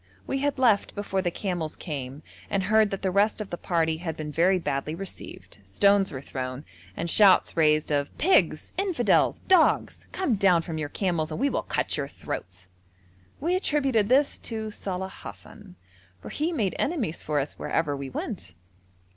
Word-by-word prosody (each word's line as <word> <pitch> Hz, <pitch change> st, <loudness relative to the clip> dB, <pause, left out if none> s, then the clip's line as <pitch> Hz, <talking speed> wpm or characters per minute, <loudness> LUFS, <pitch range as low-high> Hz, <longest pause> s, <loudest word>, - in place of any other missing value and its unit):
We 270 Hz, -, -2 dB
had 285 Hz, 0 st, 0 dB
left 230 Hz, -6 st, +2 dB
before 200 Hz, -2 st, -1 dB
the 180 Hz, -, 0 dB
camels 175 Hz, -4 st, -3 dB
came 140 Hz, -2 st, -6 dB, 0.3 s
and 195 Hz, -1 st, 0 dB
heard 215 Hz, +2 st, +4 dB
that 195 Hz, -1 st, -5 dB
the 190 Hz, -, +1 dB
rest 205 Hz, +4 st, +2 dB
of 215 Hz, -, -6 dB
the -, -, -1 dB
party 160 Hz, -3 st, 0 dB
had 160 Hz, -2 st, -5 dB
been 150 Hz, -1 st, -5 dB
very 180 Hz, +5 st, +3 dB
badly 150 Hz, -2 st, -2 dB
received, 190 Hz, -, -8 dB
stones 195 Hz, -, +3 dB
were 130 Hz, -3 st, -6 dB
thrown, 130 Hz, +1 st, -5 dB, 0.3 s
and 170 Hz, -, -2 dB
shouts 195 Hz, +2 st, +5 dB
raised 155 Hz, -2 st, +3 dB
of 145 Hz, -1 st, +1 dB
'Pigs! 375 Hz, +5 st, +2 dB
Infidels! 340 Hz, -, +2 dB
Dogs! 370 Hz, -4 st, +3 dB
Come 290 Hz, -, 0 dB
down 185 Hz, -4 st, +4 dB
from 160 Hz, -2 st, -5 dB
your 145 Hz, -2 st, -3 dB
camels 170 Hz, -3 st, -1 dB
and 155 Hz, -, -4 dB
we 275 Hz, +2 st, +1 dB
will -, -, 0 dB
cut -, -, -2 dB
your -, -, -2 dB
throats.' 95 Hz, 0 st, -7 dB, 0.7 s
We 345 Hz, +5 st, 0 dB
attributed 270 Hz, -, +1 dB
this 275 Hz, +3 st, +3 dB
to 220 Hz, -2 st, -5 dB
Saleh 190 Hz, -2 st, -5 dB
Hassan, 200 Hz, -4 st, -11 dB, 0.4 s
for -, -, -9 dB
he 315 Hz, +3 st, -1 dB
made 220 Hz, -, 0 dB
enemies 255 Hz, -, -1 dB
for 150 Hz, -1 st, -1 dB
us 140 Hz, +1 st, -5 dB
wherever 150 Hz, -3 st, -1 dB
we 140 Hz, -1 st, -6 dB
went. 90 Hz, -8 st, -6 dB
185 Hz, 175 wpm, -26 LUFS, 155-220 Hz, 0.7 s, shouts